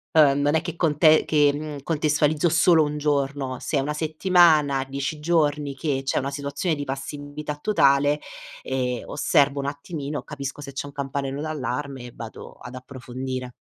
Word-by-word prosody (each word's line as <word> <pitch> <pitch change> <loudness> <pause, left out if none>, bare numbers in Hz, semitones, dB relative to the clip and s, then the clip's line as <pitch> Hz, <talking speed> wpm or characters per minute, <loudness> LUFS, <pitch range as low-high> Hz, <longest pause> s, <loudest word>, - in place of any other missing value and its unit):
ehm, 145 -3 +6
non 145 +1 +2
è 160 - +3
che 170 -1 -5
conte 155 -1 +4
che, 145 -2 +4
mhmm, 150 0 -5
contestualizzo 150 0 +1
solo 165 -1 +5
1 150 0 -3
giorno: 140 -3 -1
se 150 - -2
è - - +3
1 150 +2 -2
settimana, 155 -3 +3
10 140 +3 -4
giorni 150 -3 +1
che 135 -1 -1
c'è 135 - -1
una 140 +1 -3
situazione 145 +4 -2
di 145 - -4
passività 145 +2 -5
totale, 145 -5 +3 0.4
ehm, 125 -2 -2
osservo 140 0 +2
un 140 - -2
attimino, 145 -1 -5
capisco 140 0 -6
se 140 -1 -7
c'è 145 - -4
un 140 - -11
campanello 140 0 -3
d'allarme 140 -3 -4
e 120 - -9
vado 115 -1 -9
ad 125 - -11
approfondire. 130 0 -6
145 Hz, 165 wpm, -24 LUFS, 135-150 Hz, 0.4 s, ehm